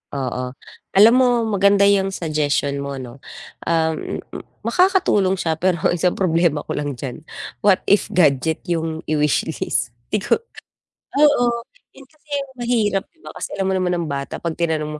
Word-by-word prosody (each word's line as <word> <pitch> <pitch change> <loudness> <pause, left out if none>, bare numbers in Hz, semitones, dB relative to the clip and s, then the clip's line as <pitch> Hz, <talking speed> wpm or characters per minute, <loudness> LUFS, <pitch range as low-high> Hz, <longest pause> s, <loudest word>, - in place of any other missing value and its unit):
Oo. 125 -1 -3 0.4
Alam 215 +4 +8
mo 255 - +5 0.2
maganda 200 -2 +3
yung 195 -1 +3
suggestion 145 -3 -1
mo 140 0 -4
no. 130 0 -9 0.5
Ah, 160 -1 +2
m 155 - -5
m - - -9 0.2
makakatulong 360 - +3
siya 165 -3 -1
pero 180 -1 0
isang 175 +1 +1
problema 165 -4 +1
ko - - -7
lang 145 -2 -3
diyan, 130 +4 -7 0.4
what 200 -2 +5
if 205 - +3
gadget 160 -1 +3
yung 165 -2 -2
i-wish 150 -2 +1 0.2
list? 125 - 0 0.2
Di - - +1
ko - - +2 0.8
oo, 290 -3 +5 0.5
yun 275 - -13
kasi 305 +1 -31 0.3
mahirap 220 -5 0
'di 330 - -36
ba - - -9
kasi - - -5
alam 190 -1 -1
mo - - +1
naman 180 -1 0
ang 170 -2 -2
bata 140 0 -4
'pag 165 -2 -3
tinanong 155 -2 -1
170 Hz, 165 wpm, -20 LUFS, 150-200 Hz, 0.8 s, Alam